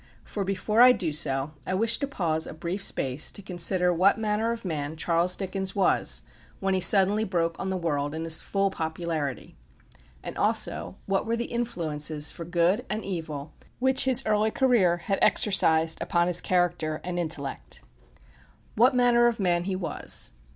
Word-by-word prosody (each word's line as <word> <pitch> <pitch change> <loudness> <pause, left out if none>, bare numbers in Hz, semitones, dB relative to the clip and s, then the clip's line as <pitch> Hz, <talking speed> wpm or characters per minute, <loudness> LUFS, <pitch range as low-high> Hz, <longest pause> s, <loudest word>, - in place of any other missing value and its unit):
For 200 - -4
before 200 +4 0
I 250 0 +8
do 165 -10 -3
so, 135 -1 -1 0.2
I 185 - -1
wish 225 +3 +1
to 280 - -2
pause 165 - -2
a - - -8
brief 170 +5 -4
space 135 -5 0
to 200 - -10
consider 180 -1 0
what 185 +4 +3
manner 220 +1 -1
of 235 -2 -6
man 155 -2 -4
Charles 170 +2 +1
Dickens 190 0 -4
was 195 - +2 0.4
when 195 0 -1
he 190 - +1
suddenly 200 +3 +5
broke 170 -4 -1
on 190 - -3
the 190 - -2
world 145 -3 -2
in 160 - -4
his 160 -1 +1
full 195 -1 -1
popularity; 160 -5 -4 0.7
and - - -7
also 90 - +2
what 195 +2 -1
were 230 +1 0
the 235 - -2
influences, 155 -10 -2
for 170 - -8
good 175 +6 +1
and 215 0 -3
evil, 160 -6 -6 0.2
which 265 +1 +3
his 260 -2 +2
early 215 0 +2
career 220 -9 +2
had 195 +3 -2
exercised 160 -6 +3
upon 170 0 +1
his 175 0 +3
character 175 -4 0
and 175 0 -4
intellect. 155 -5 -5 0.9
What 250 +4 +3
manner 240 -1 +4
of 235 -2 -1
man 175 -2 0
he 190 -1 -2
was? 185 -2 -3
180 Hz, 170 wpm, -26 LUFS, 160-210 Hz, 0.9 s, I